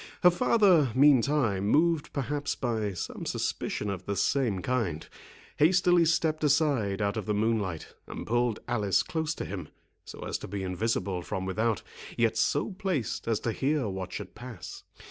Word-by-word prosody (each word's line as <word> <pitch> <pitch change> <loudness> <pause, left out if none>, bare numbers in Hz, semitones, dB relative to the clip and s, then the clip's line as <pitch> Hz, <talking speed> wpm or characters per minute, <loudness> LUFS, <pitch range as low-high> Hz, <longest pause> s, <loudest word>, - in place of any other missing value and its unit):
Her 180 - +8
father, 175 - +4
meantime, 130 -7 +4
moved 160 +4 +2
perhaps 145 +1 -2
by 110 -5 -2
some 90 - -5
suspicion 105 - -2
of 95 -2 -7
the 100 - -1
same 105 -1 +1
kind, 110 -12 -1 0.5
hastily 175 +1 +4
stepped 160 -1 +1
aside 140 -10 +2
out 100 +1 -1
of 105 - -4
the 105 - +1
moonlight, 105 -6 -1
and - - -7
pulled 120 -1 0
Alice 105 -5 +1
close 160 -1 -2
to - - -5
him, 90 -5 -6 0.3
so - - -10
as - - -3
to - - -7
be 100 0 -4
invisible 95 -1 -1
from 95 +2 -4
without, 110 +3 0 0.3
yet 115 -1 +2
so 110 - +1
placed 185 - -3
as 115 -2 +1
to 115 - -1
hear 140 +1 0
what 95 -2 -5
should - - -7
pass. 120 -5 -9
115 Hz, 165 wpm, -28 LUFS, 100-150 Hz, 0.5 s, Her